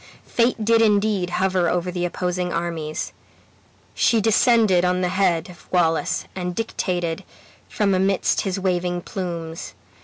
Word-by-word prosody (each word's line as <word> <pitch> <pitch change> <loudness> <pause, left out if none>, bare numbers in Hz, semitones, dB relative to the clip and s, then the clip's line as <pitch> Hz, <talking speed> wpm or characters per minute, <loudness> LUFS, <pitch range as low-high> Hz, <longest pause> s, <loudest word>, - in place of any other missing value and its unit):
Fate 235 -2 +1
did 230 +1 +4
indeed 205 -4 +2
hover 185 -1 +1
over 180 0 -1
the 175 0 -2
opposing 180 0 -2
armies. 165 -2 -3 0.8
She 230 - +3
descended 220 -3 +4
on 180 0 +1
the 180 - +1
head 180 -3 +1
of 175 - -18
Wallace, 165 -3 +1
and 180 -1 -3
dictated 175 -6 -2 0.5
from 200 -2 +1
amidst 190 +1 +1
his 195 -1 -2
waving 180 -1 -1
plumes. 170 -3 -5
180 Hz, 130 wpm, -22 LUFS, 175-200 Hz, 0.8 s, did